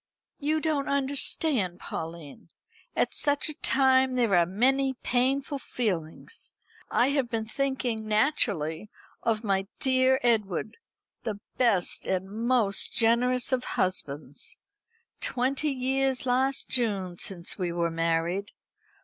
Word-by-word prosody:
"You 305 +2 +1
don't 300 -3 0
understand, 275 - +1
Pauline. 160 -3 -7 0.5
At - - +1
such 290 +1 +2
a - - -1
time 260 -1 +4
there 235 -5 +2
are 170 -1 +4
many 265 +7 +2
painful 270 +3 +1
feelings. 200 - -4 0.4
I 245 - +3
have 275 -4 0
been 225 -1 -1
thinking, 245 -3 -2
naturally, 210 - 0 0.3
of 225 -1 0
my 195 -2 0
dear 260 0 +3
Edward, 215 -4 0 0.4
the 215 -3 -4 0.2
best 220 -8 +2
and 190 0 -1
most 225 -2 +2
generous 245 +3 +2
of 255 -1 +1
husbands. 145 -6 -2 0.6
Twenty 270 +4 0
years 265 0 0
last 260 +2 +1
June 200 -8 +1
since 180 +1 -3
we 180 -2 -1
were 170 -1 -1
married. 165 +4 0
235 Hz, 115 wpm, -27 LUFS, 190-265 Hz, 0.6 s, time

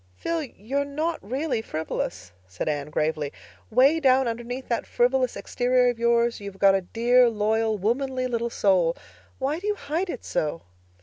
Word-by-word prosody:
"Phil, 335 -1 -2
you're 270 0 -3
not 310 +4 -2
really 255 +2 -2
frivolous," 155 - -4 0.2
said 95 -1 -5
Anne 145 -1 -2
gravely. 150 -1 -1 0.4
"'Way 270 +8 +4
down 265 -3 +4
underneath 240 +3 -4
that 235 - -2
frivolous 250 +1 +1
exterior 250 0 +2
of 235 - -10
yours 235 0 +2
you've 200 -1 -8
got 195 0 +5
a 195 - +2
dear, 240 +5 +3
loyal, 220 0 0
womanly 255 +5 -1
little 235 -1 -1
soul. 185 -6 +2 0.4
Why 280 +4 -1
do 405 - -5
you 420 - +1
hide 325 +3 -3
it 255 - -6
so?" 155 +2 -2
240 Hz, 165 wpm, -25 LUFS, 200-265 Hz, 0.4 s, got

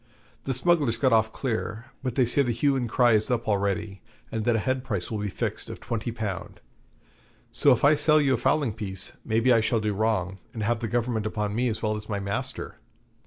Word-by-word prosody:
The 135 - -1
smugglers 140 -4 +2
got 130 0 +3
off 110 0 +3
clear, 115 -3 -3 0.2
but 130 -3 -3
they 130 - +4
say 120 +4 +2
the 125 -3 +1
hue 135 +4 +2
and 125 -3 -1
cry 120 +1 +4
is 110 -1 +3
up 120 -2 -1
already, 100 -1 -1 0.3
and 110 -1 -2
that 120 - +3
a 110 - -1
head 130 -1 0
price 100 -7 -3
will 110 - -2
be 105 - -2
fixed - - -4
of - - -7
twenty 115 0 -3
pound. 105 -5 -5 0.9
So 145 - +4
if 125 - +2
I 145 - +7
sell 155 +1 +4
you 140 -3 +3
a - - +2
fowling 125 0 +1
piece, 95 -4 -3
maybe 115 +3 +3
I 115 - +4
shall 115 +1 +1
do 105 -1 -1
wrong, 100 -3 -1 0.2
and 110 - -3
have 115 +2 +1
the 115 - -3
Government 115 -2 -1
upon 105 -1 -2
me 125 +3 +1
as 110 -1 -2
well 110 0 +1
as 105 +1 -5
my 100 -1 -1
master.' 100 0 -4
115 Hz, 225 wpm, -26 LUFS, 105-125 Hz, 0.9 s, I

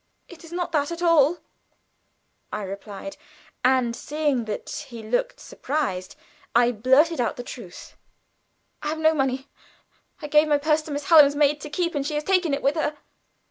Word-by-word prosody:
"It 350 -1 -14
is 330 - -13
not 350 0 -3
that 295 -1 0
at 340 +1 -5
all," 335 -1 +4 1.1
I 210 - -4
replied; 200 +7 -8 0.5
and 250 -2 +2
seeing 290 -5 -1
that 220 +7 -6
he 230 -3 -9
looked 245 - -1
surprised, 250 -11 -3 0.4
I 240 0 +5
blurted 260 +7 +3
out 235 - -1
the 245 - -7
truth. 225 -8 -10 0.9
"I - - -4
have 310 +1 -2
no 315 0 +3
money. 270 -2 -1 0.7
I 305 - -7
gave 300 +1 +4
my 295 -1 +3
purse 305 +1 +1
to 305 - -10
Miss 285 0 -4
Hallam's 295 -4 +7
maid 295 0 +2
to 300 - -7
keep 340 +3 -1
and 285 -2 -1
she 295 +2 -3
has 295 - -1
taken 365 -2 +2
it 280 +1 -2
with 275 - +3
her." 300 -1 -1
290 Hz, 180 wpm, -24 LUFS, 250-315 Hz, 1.1 s, Hallam's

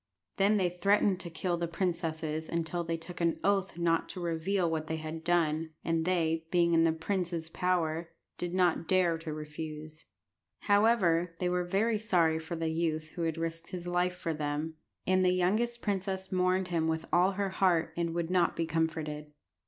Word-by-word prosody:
Then 200 +2 +4
they 180 -2 -1
threatened 200 -1 +3
to 175 - -6
kill 175 +2 -2
the 170 0 -1
princesses 160 -3 -2
unless 170 +1 -2
they 165 0 -1
took 175 +2 -8
an 170 -1 +1
oath 195 -3 +1
not 165 -1 +1
to 185 - -6
reveal 175 +2 0
what 160 -1 -2
they 160 - -1
had 160 +1 -6
done, 160 -2 +1
and 165 -1 +1
they, 165 -3 +1
being 170 -1 +3
in 165 0 +5
the 165 - +4
princes' 170 -1 -2
power, 170 -2 0 0.3
did 175 -1 -2
not 180 -2 +2
dare 175 -3 +3
to 160 -1 -6
refuse. 155 0 -7 0.6
However, 195 -6 +3
they 180 0 0
were 180 0 +1
very 210 +5 +1
sorry 170 -7 +2
for 160 +2 -5
the 165 -1 -1
youth 160 -1 -1
who 170 - -7
had 165 -1 -1
risked 165 0 -4
his 180 -1 -6
life 180 +1 +1
for 165 -2 -3
them, 150 +1 -2 0.3
and 185 0 +3
the 180 0 +3
youngest 225 +7 +1
princess 190 -2 -2
mourned 185 0 +1
him 165 -2 +1
with 160 0 -1
all 180 +3 +4
her 200 0 -1
heart, 175 -4 +2
and 170 -1 -1
would 170 0 -1
not 180 -2 +3
be 165 - 0
comforted. 160 -2 -2
170 Hz, 185 wpm, -31 LUFS, 160-185 Hz, 0.6 s, in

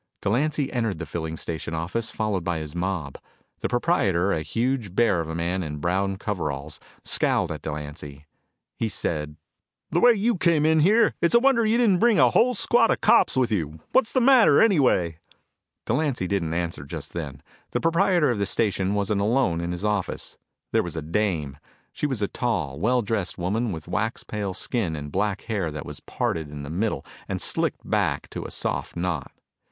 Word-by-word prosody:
Delancy 140 +7 0
entered 115 -7 -1
the 85 - -5
filling 80 -1 -4
station 80 0 -4
office, 90 +9 -2
followed 105 -7 -2
by 85 -1 -1
his 75 -2 -6
mob. 90 -6 -3 0.4
The - - -1
proprietor, 100 - +1
a 80 - -1
huge 115 - -2
bear 100 -7 +3
of 80 - -6
a 80 - -4
man 85 +3 -1
in 75 -3 -5
brown 95 +5 0
coveralls, 75 - -4 0.2
scowled - - +1
at - - -5
Delancy. 75 -1 -7 0.5
He 115 - 0
said: 75 -6 -3 0.6
"The 170 - +2
way 240 +5 +7
you 225 +1 +1
came 165 -4 +3
in 160 0 +4
here, 215 +8 +4
it's 170 +6 +3
a - - +8
wonder 260 -2 +3
you 225 +2 +3
didn't 210 -7 +3
bring 235 -1 +4
a 125 -5 +5
whole 250 - +3
squad 230 +2 +4
of - - +1
cops - - +4
with 125 -3 +2
you. 80 -6 -2
What's 260 -4 +3
the 260 - +2
matter, 255 -2 +6
anyway?" 125 - +3 0.7
Delancy 130 -5 0
didn't 85 -4 -1
answer 85 -4 -3
just 70 - -7
then. 75 -6 -6 0.3
The - - -1
proprietor 170 -3 +3
of 115 - -2
the 100 - 0
station 100 -2 0
wasn't 100 0 0
alone 105 -6 +1
in 85 +1 -3
his 90 +3 -4
office. 105 -3 -2 0.4
There - - +3
was - - -6
a 80 - -3
dame. 80 -5 -1 0.3
She 150 - -1
was 130 -7 -2
a - - +1
tall, 85 - -2
well 120 +6 +2
dressed 100 -3 -2
woman 105 +6 -1
with 80 -3 -7
wax 105 +6 -2
pale 100 -3 -4
skin 95 -7 -1
and 75 -1 -6
black 100 +2 -1
hair 105 -7 -2
that 75 -1 -6
was - - -8
parted 80 -3 -3
in 75 -1 -7
the 70 - -6
middle 105 +6 -1 0.2
and - - -3
slicked - - -1
back - - 0
to - - -5
a - - -9
soft - - -3
knot. 85 -5 -2
100 Hz, 190 wpm, -25 LUFS, 80-130 Hz, 0.7 s, a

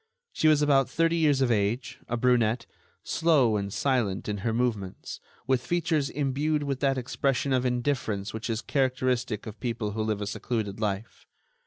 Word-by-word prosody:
She 155 - +2
was 150 -1 +5
about 135 -3 +3
thirty 165 +1 +2
years 145 -4 +3
of 130 -2 +3
age, 110 +3 -1
a 120 - -1
brunette, 120 -1 +2 0.4
slow 150 -9 +3
and 100 -1 -2
silent 120 -6 0
in 105 -1 -2
her 115 +3 -1
movements, 110 -5 -2 0.3
with 130 -2 +1
features 160 -1 0
imbued 145 +2 0
with 140 -2 -2
that 135 -1 +1
expression 135 +1 0
of 130 0 +2
indifference 120 -5 -1
which 110 +2 -5
is 115 0 -2
characteristic 130 -4 0
of 110 -1 -8
people 115 -3 -2
who 110 +1 -3
live 110 -1 -1
a 105 - -3
secluded 105 0 -3
life. 105 0 -4
125 Hz, 170 wpm, -27 LUFS, 110-140 Hz, 0.4 s, was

